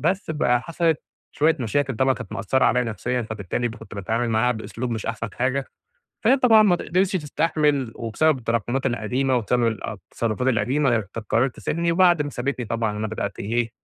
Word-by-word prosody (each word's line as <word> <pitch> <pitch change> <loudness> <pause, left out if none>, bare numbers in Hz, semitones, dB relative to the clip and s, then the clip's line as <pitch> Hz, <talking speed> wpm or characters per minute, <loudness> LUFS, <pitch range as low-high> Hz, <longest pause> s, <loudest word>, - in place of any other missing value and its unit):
بس 180 +1 0
بقى 125 -5 +2
حَصلِت 165 -1 0 0.3
شوية 160 +2 +3
مشاكل 130 +2 0
طبعًا 130 +1 +3
كانت 120 -4 -8
مأثرة 115 +4 +1
عليّا 125 - +3
نفسيًا، 120 +3 -2
فبالتالي 110 +2 -3
كنت 110 -2 -11
باتعامل 115 +4 -1
معاها 120 +3 +2
بإسلوب 115 +2 -5
مش 110 -2 -3
أحسن 115 -1 -3
حاجة، 130 +2 0 0.6
فهي 260 +5 +6
طبعًا 225 -4 +6
ما 185 -4 +4
ت - - -6
قدرِتش 185 +2 +1
تستحمل 150 -5 0
وبسبب 130 +6 +1
التراكمات 120 +3 -1
القديمة 125 +2 0
وبسبب 120 +1 +1
التصرفات 115 +2 -2
القديمة، 125 -2 +2 0.3
قررِت 125 +2 +2
تسيبني، 170 +1 -1
وبعد 175 -3 +4
ما 145 - -5
سابتني 125 -1 -3
طبعًا 110 -1 -1
أنا 110 - -1
بدأت 100 -2 -4
إيه 115 +2 -1
125 Hz, 170 wpm, -23 LUFS, 115-150 Hz, 0.6 s, فهي